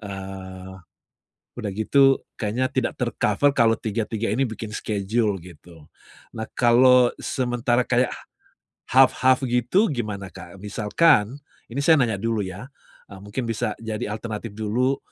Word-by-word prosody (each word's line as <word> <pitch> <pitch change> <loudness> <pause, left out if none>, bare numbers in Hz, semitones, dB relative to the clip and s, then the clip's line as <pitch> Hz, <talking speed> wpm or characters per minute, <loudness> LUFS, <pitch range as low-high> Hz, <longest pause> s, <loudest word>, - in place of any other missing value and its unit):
eee, 95 -2 -8 0.8
udah 110 -4 -4
gitu 135 +5 +4 0.2
kayaknya 115 +4 0
tidak - - 0
ter-cover 145 - +1
kalau 115 -3 +3
tiga 110 +1 -2
tiga 115 0 -2
ini 130 +5 +1
bikin 110 -1 -7
schedule 105 0 -1
gitu. 85 -2 -15 0.5
Nah, 110 -1 -5
kalau 125 +1 +5
sementara 120 -1 0
kayak 125 0 +2
h - - -8 0.7
half 130 0 +6
half 130 0 +5
gitu, 125 - +2
gimana, 105 - -4
Kak? 85 +2 -11
Misalkan, 105 - +2 0.3
ini 125 - -5
saya 160 +3 +5
nanya 120 -8 +1
dulu 115 0 -1
ya, 95 +5 -7 0.4
eee, 95 -1 -12
mungkin 105 +5 -4
bisa 110 -2 -2
jadi 110 -2 -4
alternatif 110 +1 -5
dulu, 115 +6 -1
115 Hz, 140 wpm, -23 LUFS, 105-125 Hz, 0.8 s, half